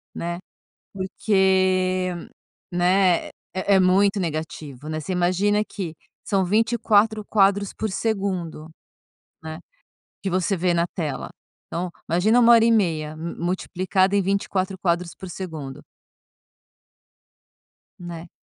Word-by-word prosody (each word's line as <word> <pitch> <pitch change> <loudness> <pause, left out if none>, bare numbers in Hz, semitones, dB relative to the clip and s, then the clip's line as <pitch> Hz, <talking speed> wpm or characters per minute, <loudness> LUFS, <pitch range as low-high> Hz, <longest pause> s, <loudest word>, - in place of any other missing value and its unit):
né. 170 +1 -3 0.5
Porque, 185 -1 +1 0.6
né, 180 0 +3
é 190 +1 -1
é - - +5
muito 195 +2 +4
negativo, 155 -4 -5
né. 155 0 -2
Você 185 +4 -4
imagina 190 +4 +2
que 170 -5 -6 0.3
são 195 -2 +1
24 220 0 +2
quadros 200 -1 +3
por 220 - -3
segundo, 190 -8 -2 0.7
né. 160 +1 -6 0.6
Que 195 - -1
você 185 +2 +1
vê 175 0 +1
na 170 0 +2
tela. 150 -6 -3 0.4
Então, 180 +1 -3 0.2
imagina 200 +8 +3
1 235 0 +7
hora 230 -1 +6
e 230 - +4
meia, 160 -8 +1
mu 165 +2 -6
multiplicada 185 +1 0
em 200 - +4
24 190 0 -1
quadros 175 -1 -1
por 190 - -9
segundo. 160 -7 -7 2.2
Né. 170 -1 -8
185 Hz, 115 wpm, -23 LUFS, 170-200 Hz, 2.2 s, 1